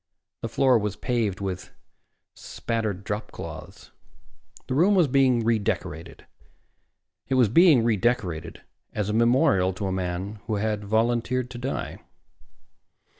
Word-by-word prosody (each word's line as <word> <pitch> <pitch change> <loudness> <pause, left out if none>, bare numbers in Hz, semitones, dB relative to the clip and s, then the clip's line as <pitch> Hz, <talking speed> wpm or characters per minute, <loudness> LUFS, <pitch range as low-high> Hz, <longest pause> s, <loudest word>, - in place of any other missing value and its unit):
The 115 - -3
floor 125 +1 +3
was 105 -2 -3
paved 115 -6 -1
with 95 -2 -4 0.6
spattered 110 -4 -4
dropcloths. 105 +2 -7 0.8
The - - -2
room 180 +9 +4
was 175 -5 +4
being 130 -3 +3
redecorated. 100 -7 -2 1.0
It 135 - 0
was 125 -5 +4
being 155 - +6
redecorated 100 -7 -1 0.3
as 105 -1 -2
a - - -1
memorial 110 -5 +3
to 100 +2 -5
a 95 - -1
man 95 +3 -3
who 110 - -1
had 105 0 -1
volunteered 120 +3 0
to 120 - -7
die. 130 +3 -4
110 Hz, 125 wpm, -25 LUFS, 100-125 Hz, 1.0 s, being